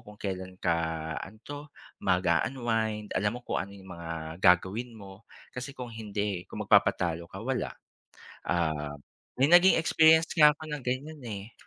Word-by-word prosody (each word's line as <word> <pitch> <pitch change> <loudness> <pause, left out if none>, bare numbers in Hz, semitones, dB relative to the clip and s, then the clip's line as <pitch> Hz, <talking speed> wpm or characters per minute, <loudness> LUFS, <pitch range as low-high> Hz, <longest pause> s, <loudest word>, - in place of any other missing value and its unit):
kung 105 -1 -14
kelan 95 -2 -5
ka 85 -2 +1 0.4
ano 110 - -9
to 145 0 -6 0.4
mag-u-unwind, 105 +4 0
alam 105 +4 0
mo 125 - -11
kung - - -1
ano 100 +1 -7
yung 95 -1 -13
mga 80 0 -6
gagawin 100 +6 +3
mo 100 +1 -13 0.3
kasi 130 +2 -6
kung 125 -2 -6
hindi 105 -4 -3
kung - - -5
magpapatalo 85 -1 +2
ka, 95 - -11
wala. 130 -1 -1 0.7
Ah, 75 -4 -1 0.4
may 135 - +5
naging 175 +2 +7
experience 160 0 +5
nga 150 -3 +8
ako 155 +1 -10
na 145 - -4
ganyan, 140 +4 -4
eh. 105 0 -7
105 Hz, 155 wpm, -29 LUFS, 90-130 Hz, 0.7 s, nga